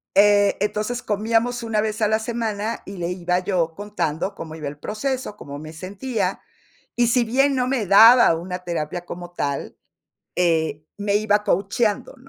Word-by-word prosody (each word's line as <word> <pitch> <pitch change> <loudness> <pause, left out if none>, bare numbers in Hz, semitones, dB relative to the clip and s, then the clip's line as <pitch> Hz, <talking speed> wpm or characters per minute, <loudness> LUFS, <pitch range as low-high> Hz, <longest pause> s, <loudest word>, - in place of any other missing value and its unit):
Eh, 205 0 +5
entonces 210 +4 -2
comíamos 225 +4 0
1 220 -2 0
vez 215 0 -3
a 210 - +4
la 220 +1 +2
semana, 225 -1 -3
y 195 0 -8
le 170 -1 -2
iba 180 0 0
yo 180 -3 -1
contando 195 -3 -3
cómo 160 -1 -8
iba 155 -2 -6
el 145 +1 -7
proceso, 250 - -3
cómo 145 0 -8
me 155 +1 -9
sentía. 195 +4 -3 0.5
Y 240 -1 +3
si 240 +1 +3
bien 270 +4 +2
no 250 -1 0
me 255 -5 0
daba 225 -1 +8
una 180 +2 -5
terapia 170 0 -4
como 175 0 -8
tal, 140 -5 -3 0.6
eh, 160 -3 +1
me 205 0 0
iba 210 0 +1
coacheando 205 +5 0
205 Hz, 165 wpm, -22 LUFS, 175-225 Hz, 0.6 s, daba